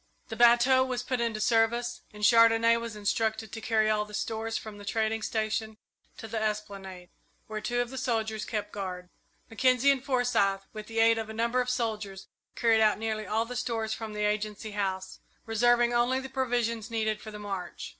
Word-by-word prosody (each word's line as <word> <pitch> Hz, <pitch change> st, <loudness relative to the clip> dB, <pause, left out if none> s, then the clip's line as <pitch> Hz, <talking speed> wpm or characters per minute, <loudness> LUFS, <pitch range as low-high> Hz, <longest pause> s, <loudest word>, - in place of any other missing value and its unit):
The 225 Hz, -, -5 dB
bateau 240 Hz, +3 st, +5 dB
was 255 Hz, -2 st, -3 dB
put 255 Hz, -2 st, -2 dB
into 230 Hz, -2 st, -1 dB
service, 230 Hz, +2 st, +1 dB
and 210 Hz, 0 st, -10 dB
Chandonnais 230 Hz, +1 st, +6 dB
was 230 Hz, -2 st, -6 dB
instructed 220 Hz, +1 st, -1 dB
to 225 Hz, -, -7 dB
carry 220 Hz, -2 st, +2 dB
all 215 Hz, -1 st, +2 dB
the 210 Hz, 0 st, -9 dB
stores 225 Hz, +1 st, -2 dB
from 215 Hz, -2 st, -8 dB
the -, -, -10 dB
trading 220 Hz, +1 st, -1 dB
station 220 Hz, 0 st, -2 dB, 0.4 s
to 225 Hz, -, -8 dB
the 220 Hz, 0 st, -3 dB
esplanade, 200 Hz, -4 st, -4 dB, 0.4 s
where 215 Hz, 0 st, -5 dB
two 245 Hz, +2 st, 0 dB
of 245 Hz, 0 st, -4 dB
the 265 Hz, -, -5 dB
soldiers 220 Hz, -4 st, -1 dB
kept 210 Hz, -1 st, -4 dB
guard. 180 Hz, -3 st, -5 dB, 0.4 s
Mackenzie 255 Hz, +3 st, +3 dB
and 270 Hz, -2 st, -1 dB
Forsyth, 240 Hz, -8 st, +1 dB
with 215 Hz, -1 st, -8 dB
the 225 Hz, 0 st, -3 dB
aid 225 Hz, 0 st, +5 dB
of 220 Hz, -1 st, -5 dB
a -, -, -6 dB
number 235 Hz, +3 st, +1 dB
of 250 Hz, -, -3 dB
soldiers, 215 Hz, -5 st, -3 dB, 0.3 s
carried 225 Hz, -2 st, +3 dB
out 215 Hz, -1 st, +4 dB
nearly 215 Hz, -1 st, -3 dB
all 220 Hz, +3 st, 0 dB
the 250 Hz, +2 st, -7 dB
stores 225 Hz, -3 st, -2 dB
from 220 Hz, -1 st, -6 dB
the 210 Hz, 0 st, -1 dB
Agency 210 Hz, +1 st, -2 dB
House, 190 Hz, -2 st, -3 dB, 0.3 s
reserving 240 Hz, +2 st, +3 dB
only 240 Hz, +2 st, +2 dB
the 265 Hz, 0 st, -7 dB
provisions 240 Hz, -4 st, -1 dB
needed 220 Hz, -2 st, -1 dB
for 220 Hz, -, -8 dB
the 210 Hz, -, -8 dB
march. 195 Hz, -4 st, -6 dB
225 Hz, 195 wpm, -29 LUFS, 210-235 Hz, 0.4 s, Chandonnais